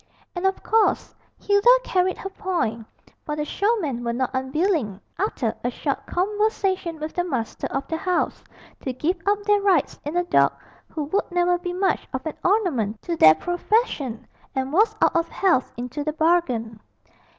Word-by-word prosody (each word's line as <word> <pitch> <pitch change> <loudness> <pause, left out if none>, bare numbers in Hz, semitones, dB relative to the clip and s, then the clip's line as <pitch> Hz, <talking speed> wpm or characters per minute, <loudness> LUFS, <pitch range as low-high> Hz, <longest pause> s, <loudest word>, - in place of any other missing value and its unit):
And 355 +2 +1
of 385 - -2
course 440 -1 +2 0.2
Hilda 405 +3 +3
carried 370 0 +1
her 390 - -6
point, 340 - -2 0.4
for 300 - -3
the 300 0 -2
showmen 335 - 0
were 235 0 -1
not 255 +1 -1
unwilling, 265 - 0 0.2
after 325 - -1
a 245 - +1
short 275 +3 -3
conversation 385 -3 0
with 310 +1 -5
the 355 - 0
master 260 -10 -3
of 270 +1 -3
the 320 - -2
house, 360 +1 -1 0.4
to 260 - -4
give 320 +8 -1
up 410 0 +2
their 415 0 +3
rights 380 -7 +2
in 300 +4 -3
a 355 - +3
dog 350 - +3 0.4
who 310 - -4
would 350 +8 -1
never 355 0 +2
be 355 0 -4
much 375 +2 0
of 260 +2 -4
an 315 - -3
ornament 290 - +1
to 340 - -2
their 155 - +7
profession, 325 - -1 0.3
and 265 +1 -2
was 430 +4 +3
out - - +3
of 335 0 +1
health 355 -10 +1
into 250 +4 -4
the 305 +1 -2
bargain. 280 -10 +1
335 Hz, 175 wpm, -23 LUFS, 260-385 Hz, 0.4 s, their